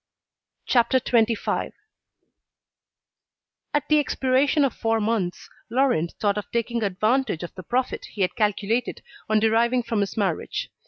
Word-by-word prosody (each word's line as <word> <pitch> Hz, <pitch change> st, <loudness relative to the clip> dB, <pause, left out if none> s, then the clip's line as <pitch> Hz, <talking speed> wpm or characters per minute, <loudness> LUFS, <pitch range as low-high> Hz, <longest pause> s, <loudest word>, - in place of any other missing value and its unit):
CHAPTER 250 Hz, +1 st, +3 dB
XXV 230 Hz, -3 st, 0 dB, 2.0 s
At 295 Hz, -, 0 dB
the 305 Hz, 0 st, +4 dB
expiration 275 Hz, +1 st, +2 dB
of 265 Hz, -, -1 dB
four 225 Hz, 0 st, 0 dB
months, 210 Hz, -5 st, -1 dB, 0.2 s
Laurent 235 Hz, -, +1 dB
thought 205 Hz, -1 st, +1 dB
of 210 Hz, -, -9 dB
taking 235 Hz, 0 st, -1 dB
advantage 215 Hz, -, 0 dB
of 175 Hz, -, -7 dB
the 185 Hz, -, -8 dB
profit 250 Hz, +8 st, -2 dB
he 210 Hz, -, -7 dB
had 185 Hz, -, +1 dB
calculated 215 Hz, +2 st, -1 dB, 0.3 s
on 215 Hz, 0 st, +4 dB
deriving 230 Hz, +3 st, +2 dB
from 230 Hz, -2 st, -1 dB
his 200 Hz, +1 st, -2 dB
marriage. 195 Hz, -6 st, -2 dB
225 Hz, 130 wpm, -24 LUFS, 205-255 Hz, 2.0 s, the